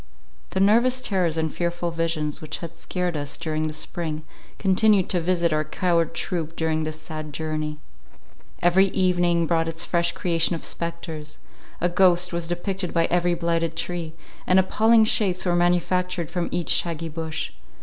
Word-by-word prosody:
The 190 - -2
nervous 235 +6 +4
terrors 180 -9 0
and 160 -2 -1
fearful 175 0 -2
visions 165 -3 -2
which 155 -1 -4
had 170 -1 -8
scared 180 0 -3
us 145 -1 -3
during 155 -1 -2
the - - -3
spring, 155 -1 -3 0.3
continued 195 0 +3
to 180 - +2
visit 170 -1 +1
our 155 0 +1
coward 170 +1 0
troop 165 -3 -3
during 160 -1 0
this 155 0 -5
sad 155 -1 -7
journey. 155 0 -3 0.9
Every 185 +3 +5
evening 175 -3 +2
brought 165 0 +1
its 165 +1 -1
fresh 170 -1 +1
creation 170 -2 +1
of 165 - -7
spectres; 165 -2 -5 0.4
a 175 - +2
ghost 180 0 +3
was 170 -1 -1
depicted 180 +1 -3
by 165 0 +4
every 175 0 +2
blighted 165 -1 -1
tree; 165 -1 -4 0.3
and 185 - +5
appalling 220 +4 +4
shapes 195 -4 +1
were 175 -1 +2
manufactured 175 0 +1
from 175 -2 -2
each 175 -1 0
shaggy 165 -1 +1
bush. 160 0 -4
170 Hz, 160 wpm, -24 LUFS, 160-180 Hz, 0.9 s, Every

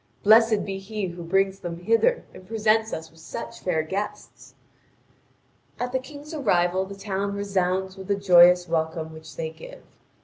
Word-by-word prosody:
Blessed 220 0 +5
be 195 -1 -4
he 205 +1 -4
who 175 0 -9
brings 195 +3 +1
them 175 -3 -5
hither 230 - +2
and 185 - -13
presents 220 0 +1
us 160 0 -6
with 165 - -20
such 115 -7 -7
fair 160 -4 0
guests!" 195 +6 -6 1.2
At 245 +1 -2
the 260 - 0
King's 290 +4 -11
arrival 185 - +1
the 200 - -8
town 200 0 -3
resounds 190 -1 -1
with 190 -1 -9
the 200 - +2
joyous 180 -2 +6
welcome 160 -1 -2
which 160 0 -12
they 160 -1 -4
give. 160 0 -12
195 Hz, 165 wpm, -25 LUFS, 175-215 Hz, 1.2 s, joyous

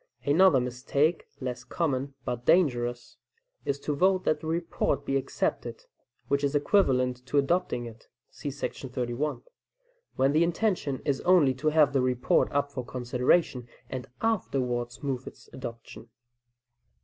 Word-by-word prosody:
Another 160 0 +5
mistake, 130 +6 0
less 125 -2 -4
common, 140 -4 -2
but 120 -1 -3
dangerous, 120 -7 +1 0.5
is 140 0 -1
to 150 - -2
vote 185 +4 +3
that 155 - +1
the 155 - -7
report 165 -3 -1
be 135 - -1
accepted 135 - -2 0.4
(which 140 0 +1
is 140 +1 0
equivalent 130 -6 +2
to 145 - 0
adopting 140 -4 +1
it, 115 -1 -11 0.2
see 145 - -5
§ 135 -1 -5
31), 125 +4 -2 0.7
when 135 +1 +3
the 155 +3 +4
intention 170 -6 -1
is 140 -2 0
only 175 -7 +5
to 130 +4 -3
have 150 -2 +4
the 135 - +3
report 125 -1 +2
up 145 0 0
for 130 -3 -4
consideration 125 +2 0 0.2
and 130 -1 -5 0.2
afterwards 125 - -1
move 135 -2 -3
its - - -11
adoption. 115 -3 -9
140 Hz, 140 wpm, -28 LUFS, 125-155 Hz, 0.7 s, Another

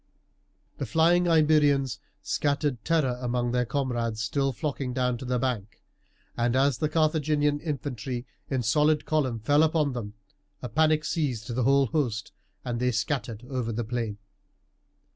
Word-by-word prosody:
The 140 - -3
flying 170 +7 +3
Iberians 150 -5 +3 0.2
scattered 140 -4 -1
terror 140 -7 +1
among 120 -1 -1
their 125 -1 0
comrades 120 -5 -1
still 135 +7 0
flocking 135 -1 -3
down 125 -1 0
to 130 - -7
the 125 0 0
bank, 115 -4 -3 0.6
and 120 +1 +1
as 135 -1 +2
the 155 - 0
Carthaginian 150 -2 +1
infantry 130 -5 -4 0.2
in 130 -3 0
solid 150 +6 +2
column 140 -7 0
fell 145 +7 +3
upon 155 -3 +2
them, 110 -4 -6 0.5
a 125 - -4
panic 155 0 +2
seized 125 -9 -2
the 125 - 0
whole 140 +1 +4
host 125 -7 -2 0.3
and 120 -1 -2
they 125 +1 +2
scattered 120 -1 -2
over 125 -4 -2
the 115 +2 -2
plain. 115 -2 -3
130 Hz, 145 wpm, -27 LUFS, 120-150 Hz, 0.6 s, whole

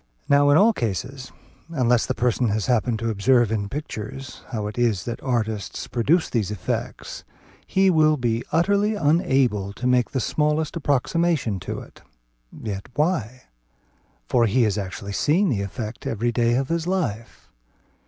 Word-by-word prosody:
Now 145 0 +5
in 145 - +6
all 220 +5 +5
cases, 125 - -4 0.4
unless 125 -7 +2
the - - -1
person 125 0 +1
has 105 -1 0
happened 120 -1 +1
to 115 +1 -2
observe 120 +2 +3
in 100 -2 -1
pictures 135 -2 -6
how 110 -4 -3
it 105 - -5
is 115 -7 +1
that 120 - -5
artists 110 -7 -2
produce 155 +9 +2
these 110 -6 -1
effects, 105 -4 -4 0.4
he 190 0 +3
will 155 -2 +4
be 120 -2 -1
utterly 200 +5 +2
unable 135 - +1
to 125 - -6
make 125 -1 +3
the 130 - -2
smallest 150 +5 0
approximation 145 - 0
to - - -5
it. - - -15 0.5
Yet 100 +1 -6
why? 140 - -1 0.8
For 120 - +3
he 120 +4 +3
has 105 -3 +1
actually 100 0 -5
seen 175 - +2
the 110 -8 0
effect 110 +3 -6
every 115 +2 0
day 120 0 +2
of 130 +1 -1
his 165 0 -1
life. 150 - -3
125 Hz, 155 wpm, -23 LUFS, 110-150 Hz, 0.8 s, in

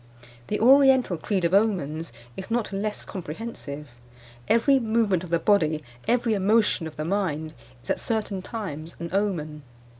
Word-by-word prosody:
The 210 - -1
oriental 260 -4 +5
creed 185 +2 -1
of 170 - +1
omens 175 -7 +1 0.2
is 190 - -7
not 230 -3 -1
less 210 +2 -3
comprehensive. 155 -5 -7 0.6
Every 250 +5 +4
movement 220 -6 +1
of 180 - -8
the 170 - +3
body, 160 -5 +2 0.2
every 235 -1 +2
emotion 210 -3 +2
of 155 - -10
the 155 - -4
mind, 160 -5 -1 0.3
is - - -3
at - - 0
certain 215 -4 -2
times 170 -7 -6
an 170 0 -5
omen. 165 -7 -1
195 Hz, 150 wpm, -25 LUFS, 160-225 Hz, 0.6 s, oriental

